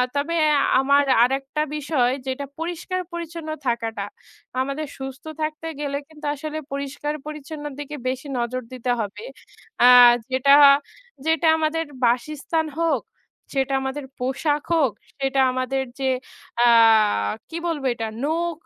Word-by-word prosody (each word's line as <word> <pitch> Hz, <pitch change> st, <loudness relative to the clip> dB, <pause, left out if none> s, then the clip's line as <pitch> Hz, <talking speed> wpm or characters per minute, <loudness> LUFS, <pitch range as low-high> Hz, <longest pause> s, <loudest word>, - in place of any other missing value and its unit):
তবে 290 Hz, +4 st, -1 dB, 0.4 s
আমার 280 Hz, +1 st, +4 dB, 0.2 s
আরেকটা 270 Hz, +3 st, -1 dB
বিষয় 280 Hz, -4 st, +1 dB, 0.2 s
যেটা 265 Hz, +2 st, -3 dB
পরিষ্কার 350 Hz, +2 st, -3 dB
পরিচ্ছন্ন 335 Hz, -1 st, -6 dB, 0.2 s
থাকাটা। 225 Hz, -3 st, -1 dB, 0.6 s
আমাদের 275 Hz, +3 st, -3 dB
সুস্থ 265 Hz, 0 st, -7 dB, 0.2 s
থাকতে 310 Hz, +1 st, -3 dB
গেলে 280 Hz, -1 st, -2 dB
কিন্তু 305 Hz, -1 st, -12 dB
আসলে 310 Hz, +2 st, -5 dB
পরিষ্কার 280 Hz, +1 st, -3 dB
পরিচ্ছন্নর 300 Hz, -1 st, -7 dB
দিকে 295 Hz, +1 st, -6 dB
বেশি 260 Hz, +2 st, -3 dB
নজর 240 Hz, +2 st, -2 dB
দিতে 250 Hz, 0 st, -2 dB
হবে। 210 Hz, -, -4 dB, 0.6 s
অ্যা 245 Hz, -, +7 dB, 0.4 s
যেটা, 265 Hz, +2 st, +4 dB, 0.7 s
যেটা 320 Hz, 0 st, +2 dB
আমাদের 320 Hz, +1 st, 0 dB, 0.2 s
বাসস্থান 305 Hz, +6 st, 0 dB
হোক, 330 Hz, -1 st, +1 dB, 0.5 s
সেটা 270 Hz, 0 st, 0 dB
আমাদের 265 Hz, +1 st, -4 dB
পোশাক 280 Hz, +4 st, -1 dB
হোক, 290 Hz, -7 st, +3 dB, 0.3 s
সেটা 270 Hz, 0 st, 0 dB
আমাদের 255 Hz, +1 st, -1 dB, 0.2 s
যে 265 Hz, -1 st, +1 dB, 0.6 s
আ -, -, +6 dB, 0.8 s
কি 330 Hz, -, -5 dB
বলবো 305 Hz, -5 st, -2 dB
এটা 225 Hz, -1 st, -4 dB, 0.2 s
নখ 330 Hz, +1 st, -1 dB
285 Hz, 125 wpm, -23 LUFS, 265-310 Hz, 0.8 s, অ্যা